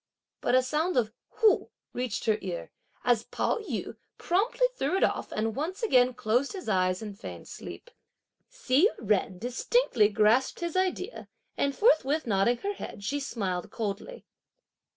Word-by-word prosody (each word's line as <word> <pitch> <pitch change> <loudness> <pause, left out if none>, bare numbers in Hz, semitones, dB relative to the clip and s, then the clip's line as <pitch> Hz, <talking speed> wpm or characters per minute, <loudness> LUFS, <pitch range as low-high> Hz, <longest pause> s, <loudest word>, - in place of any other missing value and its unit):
But 245 - +2
a 255 - +5
sound 305 +5 0
of 220 -3 +1 0.2
"hu" 440 -3 +3 0.2
reached 250 -3 -3
her 215 -1 +2
ear, 180 -3 -5 0.3
as 235 -2 +2
Pao - - -1
yü 430 - -5 0.2
promptly 410 +8 +1
threw 295 - 0
it - - +2
off - - 0
and 220 0 -1
once 350 - -3
again 255 - +4
closed 245 - +1
his 380 - -7
eyes 185 -1 +1
and 210 -2 -6
feigned 220 - -9
sleep. 485 - -9 0.6
Hsi 385 - +3 0.2
Jen 195 -3 +1
distinctly 245 - +2
grasped 215 +8 +2
his 340 0 -3
idea 370 +3 -1 0.3
and, 280 -1 0
forthwith 310 - +3
nodding 220 +2 +2
her 405 - 0
head, 210 - -8
she 285 +8 -1
smiled 195 -10 -3
coldly. 220 - -5
255 Hz, 150 wpm, -28 LUFS, -, 0.6 s, a